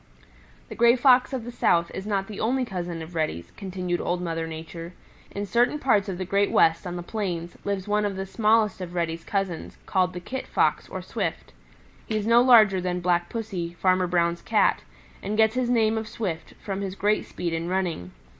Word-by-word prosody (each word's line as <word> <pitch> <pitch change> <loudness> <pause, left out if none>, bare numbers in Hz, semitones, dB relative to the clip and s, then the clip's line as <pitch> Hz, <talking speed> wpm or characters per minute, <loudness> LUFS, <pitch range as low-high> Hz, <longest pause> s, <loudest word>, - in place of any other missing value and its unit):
"The - - -6
Gray 235 +1 +5
Fox 255 0 +5
of 260 -4 -3
the 240 - -7
South 170 -7 +2
is 190 - -6
not 195 -2 0
the 205 0 -8
only 255 +3 +1
cousin 175 -5 -4
of 160 +2 -11
Reddy's," 155 - -2
continued 185 -3 -3
Old 175 0 -1
Mother 165 -2 -3
Nature. 165 +2 -8 0.4
"In 200 +1 -4
certain 240 +7 +2
parts 215 -8 +2
of 185 - -3
the 185 - -3
Great 200 +2 +2
West, 165 +2 +3
on 175 - -4
the 175 - -5
plains, 175 -4 -4
lives 200 -1 -2
one 210 0 +1
of 205 -2 -1
the 190 0 -4
smallest 215 0 +2
of 180 -1 -6
Reddy's 165 -1 -2
cousins, 195 -5 -3
called 185 -1 +1
the 180 - -5
Kit 255 +9 -6
Fox - - +1
or - - -6
Swift. - - -4 0.5
He 215 - -1
is 210 - -2
no 230 +1 +6
larger 215 -7 +6
than 180 0 -1
Black 175 -1 +1
Pussy, 195 -7 -4
Farmer 185 +1 +2
Brown's 170 -1 +1
Cat, 220 -2 +2 0.4
and 210 +2 -3
gets 220 0 +4
his 250 -1 0
name 225 -2 +2
of 220 - -6
Swift 185 -8 -5
from 195 -1 -4
his 195 -1 -4
great 210 +1 +1
speed 170 -2 -4
in 165 +1 -2
running. 180 - -2
190 Hz, 205 wpm, -25 LUFS, 175-220 Hz, 0.5 s, no